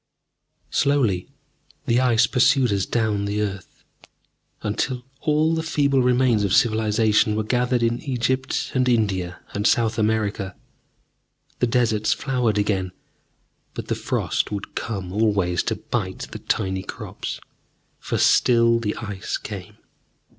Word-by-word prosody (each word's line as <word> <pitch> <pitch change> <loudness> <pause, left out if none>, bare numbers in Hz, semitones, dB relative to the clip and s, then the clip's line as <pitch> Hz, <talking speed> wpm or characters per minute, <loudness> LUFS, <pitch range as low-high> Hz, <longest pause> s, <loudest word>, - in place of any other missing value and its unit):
Slowly 125 -11 +1 0.6
the 120 -2 +2
Ice 120 -2 +4
pursued 125 -1 +3
us 100 -1 -1
down 110 -3 0
the 100 +1 -2
earth, 100 -3 -5 0.8
until 125 +4 -2
all 155 +2 +2
the 160 - 0
feeble 140 -4 +1
remains 125 -3 +3
of 100 0 +2
civilization 110 -1 +3
were 110 - 0
gathered 125 +2 +1
in 115 +1 0
Egypt 130 -1 -1
and 130 -1 +2
India 95 -7 0
and 105 +2 +1
South 110 -1 +2
America. 105 -3 -1 1.0
The 125 - +2
deserts 115 -3 +2
flowered 125 -5 0
again, 95 -3 0 0.8
but - - -6
the - - +2
frost - - -1
would 100 -1 -5
come 95 -5 -4
always 100 -5 +1
to - - -1
bite - - -4
the - - -7
tiny 95 -3 -1
crops. - - -6 0.6
For - - -3
still 115 -1 +4
the 105 -2 -2
Ice 100 -4 -4
came. - - -8
110 Hz, 130 wpm, -23 LUFS, 105-125 Hz, 1.0 s, Ice